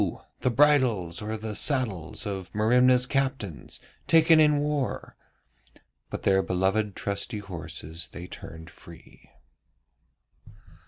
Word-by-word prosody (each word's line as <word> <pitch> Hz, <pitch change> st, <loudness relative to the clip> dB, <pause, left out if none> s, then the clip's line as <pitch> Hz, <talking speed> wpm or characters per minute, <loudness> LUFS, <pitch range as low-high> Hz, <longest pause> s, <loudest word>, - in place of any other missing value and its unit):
the 125 Hz, -, +1 dB
bridles 125 Hz, -, +3 dB
or 110 Hz, +1 st, -3 dB
the 110 Hz, 0 st, -6 dB
saddles 110 Hz, -, -2 dB
of 95 Hz, -4 st, -5 dB
Merimna's 125 Hz, +3 st, +4 dB
captains, 130 Hz, -, -3 dB, 0.3 s
taken 165 Hz, -1 st, +6 dB
in 150 Hz, -1 st, +5 dB
war,' 145 Hz, -2 st, -2 dB, 0.9 s
but -, -, -6 dB
their 95 Hz, -1 st, +3 dB
beloved 95 Hz, +3 st, 0 dB
trusty 100 Hz, +3 st, -3 dB
horses 85 Hz, -4 st, -7 dB
they 90 Hz, -, -9 dB
turned 80 Hz, -2 st, -10 dB
free. 85 Hz, -2 st, -16 dB
105 Hz, 105 wpm, -26 LUFS, 90-130 Hz, 0.9 s, taken